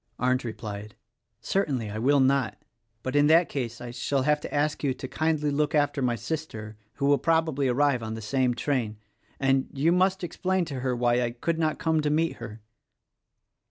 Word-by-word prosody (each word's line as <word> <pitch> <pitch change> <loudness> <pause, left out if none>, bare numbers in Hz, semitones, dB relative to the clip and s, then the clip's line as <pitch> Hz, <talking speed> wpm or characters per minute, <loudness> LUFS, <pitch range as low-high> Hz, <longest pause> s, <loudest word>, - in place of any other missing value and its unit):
Arndt 125 0 +1
replied, 105 -2 -6 0.5
"Certainly 130 - -1
I 110 - -4
will 140 +5 +3
not; 135 0 +2 0.5
but 130 +2 -3
in 145 0 +5
that 165 +2 +5
case 120 -4 -4
I 120 0 -7
shall 135 +2 -1
have 150 +1 +2
to - - -7
ask 150 +1 0
you 135 -3 +1
to 130 - -6
kindly 155 0 0
look 150 +2 0
after 145 -1 +1
my 125 -2 +1
sister 115 -4 -5
— 110 - -42
who 140 - -1
will 140 0 +4
probably 160 -4 +1
arrive 130 0 +2
on 110 0 -4
the 110 - -6
same 125 +2 +1
train, 120 -5 -1 0.2
— - - -36
and 135 -1 +2
you 145 +5 +2
must 185 +1 +2
explain 185 +1 -1
to 140 -5 -5
her 125 -1 -1
why 120 0 +2
I 120 - 0
could 160 +8 -2
not 155 -1 +1
come 160 -1 +1
to 150 - 0
meet 160 +2 +1
her." 110 -2 -9
140 Hz, 200 wpm, -27 LUFS, 120-150 Hz, 0.5 s, in